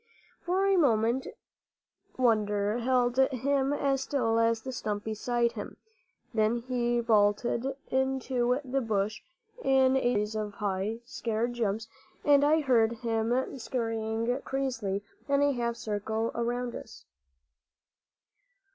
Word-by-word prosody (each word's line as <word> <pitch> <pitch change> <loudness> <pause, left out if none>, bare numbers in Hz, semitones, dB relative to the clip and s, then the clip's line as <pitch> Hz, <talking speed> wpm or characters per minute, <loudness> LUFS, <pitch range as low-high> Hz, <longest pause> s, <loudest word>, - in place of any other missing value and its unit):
For 370 +3 +1
a 395 -1 +3
moment 240 -4 +2 0.9
wonder 210 -3 +2
held 245 0 +1
him 265 +1 +2
as 275 -2 +1
still 230 -5 +1
as 230 0 +2
the 265 - -4
stump 210 -4 -3
beside 235 +2 0
him; - - -7 0.6
then 220 +1 +2
he 240 0 0
bolted 225 +2 +2 0.2
into 260 -1 +1
the 265 +1 0
bush 215 -2 -1 0.4
in 265 -1 +4
a 265 - +2
series 210 -3 0
of 210 -1 -4
high, 205 +2 -2
scared 235 -2 -2
jumps, 225 -1 -1 0.4
and 285 -1 +6
I 310 +2 +4
heard 235 -5 +3
him 235 +3 -1
scurrying 225 +1 -2
crazily 235 -8 -2 0.3
in 280 0 +3
a 285 - +4
half 235 -2 -1
circle 220 +1 -2
around 240 +1 -2
us. - - -10
235 Hz, 120 wpm, -29 LUFS, 220-260 Hz, 0.9 s, and